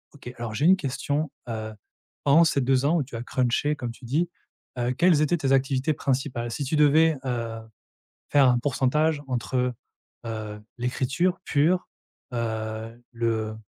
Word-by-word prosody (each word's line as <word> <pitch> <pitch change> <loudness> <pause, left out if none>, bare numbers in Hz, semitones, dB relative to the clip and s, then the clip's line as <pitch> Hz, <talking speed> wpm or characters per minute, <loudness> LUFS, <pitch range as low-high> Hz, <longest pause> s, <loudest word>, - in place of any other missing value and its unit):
OK. 125 -3 -9
Alors, 120 -2 -5
j'ai 145 - +1
une 185 - +7
question, 145 0 -2 0.2
heu, 110 -1 -4 0.5
pendant 145 +4 +6
ces 145 -4 +2
2 130 +1 +2
ans 165 +4 +3
où 150 - +1
tu 125 -2 -10
as 115 - -4
crunché 130 +4 0
comme 120 -4 -4
tu 125 - -13
dis, 160 +8 0 0.5
heu, 120 0 0
quelles 165 +2 +4
étaient 155 +3 +2
tes 135 -4 -1
activités 135 +2 +2
principales? 125 -4 -2
Si 140 - -3
tu 155 - -1
devais, 155 +2 +5
heu, 115 -3 -3 0.7
faire 140 -2 +6
un 125 -1 +4
pourcentage 145 +4 +1
entre, 125 0 -1 0.5
heu, 110 -2 -5 0.2
l'écriture 135 +8 0
pure, 165 +6 +2 0.5
heu, 110 0 -4
le 115 -2 -1
130 Hz, 160 wpm, -25 LUFS, 120-150 Hz, 0.7 s, une